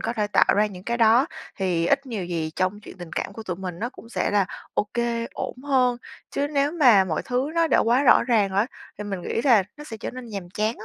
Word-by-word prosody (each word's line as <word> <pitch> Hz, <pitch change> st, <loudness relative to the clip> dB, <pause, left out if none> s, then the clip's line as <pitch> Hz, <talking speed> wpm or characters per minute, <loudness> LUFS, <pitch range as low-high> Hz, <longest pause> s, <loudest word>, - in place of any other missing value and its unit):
có 230 Hz, -, -2 dB
thể 210 Hz, -3 st, -1 dB
tạo 205 Hz, -, +3 dB
ra 210 Hz, -, +4 dB
những 185 Hz, -3 st, -10 dB
cái 235 Hz, 0 st, -1 dB
đó, 235 Hz, +5 st, +5 dB, 0.3 s
thì 175 Hz, -3 st, 0 dB
ít 275 Hz, +4 st, +1 dB
nhiều 220 Hz, -7 st, -4 dB
gì 165 Hz, -3 st, -3 dB
trong 185 Hz, +3 st, -1 dB
chuyện 205 Hz, -, -12 dB
tình 175 Hz, -2 st, -9 dB
cảm -, -, -3 dB
của 225 Hz, -, -8 dB
tụi 180 Hz, -5 st, -4 dB
mình 180 Hz, -2 st, -6 dB
nó 235 Hz, -, -2 dB
cũng 230 Hz, -, -14 dB
sẽ -, -, -1 dB
là 200 Hz, -2 st, +2 dB, 0.3 s
OK, 235 Hz, +2 st, -1 dB
ổn -, -, -4 dB
hơn, 255 Hz, -4 st, +2 dB, 0.3 s
chứ 285 Hz, -, -1 dB
nếu 285 Hz, 0 st, +1 dB
mà 245 Hz, -, +6 dB
mọi 160 Hz, -4 st, -2 dB
thứ 255 Hz, +3 st, -1 dB
nó 335 Hz, 0 st, +3 dB
đã -, -, +4 dB
quá 240 Hz, +4 st, +3 dB
rõ 250 Hz, -, +6 dB
ràng 215 Hz, -5 st, +2 dB
á 200 Hz, +4 st, +2 dB, 0.3 s
thì 210 Hz, -, -5 dB
mình 195 Hz, -3 st, -4 dB
nghĩ 230 Hz, -, -2 dB
là 235 Hz, -8 st, +6 dB
nó 295 Hz, -, -10 dB
sẽ 225 Hz, -7 st, -7 dB
trở -, -, -5 dB
nên 255 Hz, -1 st, -9 dB
nhàm 195 Hz, -6 st, -7 dB
chán 215 Hz, +4 st, -1 dB
á 215 Hz, -, -9 dB
220 Hz, 260 wpm, -24 LUFS, 190-250 Hz, 0.3 s, mà